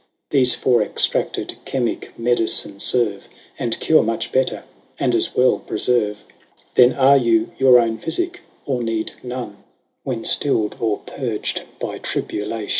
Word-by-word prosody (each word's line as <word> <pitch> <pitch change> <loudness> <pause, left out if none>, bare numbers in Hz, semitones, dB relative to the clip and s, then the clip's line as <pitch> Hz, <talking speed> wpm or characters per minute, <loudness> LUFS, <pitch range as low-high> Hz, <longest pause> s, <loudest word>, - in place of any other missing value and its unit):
Thefe 130 -3 +4
for 125 -3 +2
extracted 105 - 0
chimique 125 -3 -2
medicine 115 -4 +1
ferve, 105 -3 0 0.3
And 115 -2 -2
cure 160 - +4
much 115 +1 -2
better, 130 0 0 0.4
and - - +1
as - - 0
well 125 0 +3
preferve; 105 -4 -1 0.5
Then 125 0 +6
are 140 0 +5
you 115 -3 +2
your 130 -2 +7
own 115 -1 0
phyficke, 355 0 -2 0.3
or 130 -3 -1
need 115 -1 -2
none, 125 -5 -6 0.4
When 120 -4 -4
Still'd, 110 -7 +1
or 110 -3 0
purg'd 120 -6 -3 0.2
by - - -5
tribulation. 105 0 -4
120 Hz, 135 wpm, -20 LUFS, 110-130 Hz, 0.5 s, your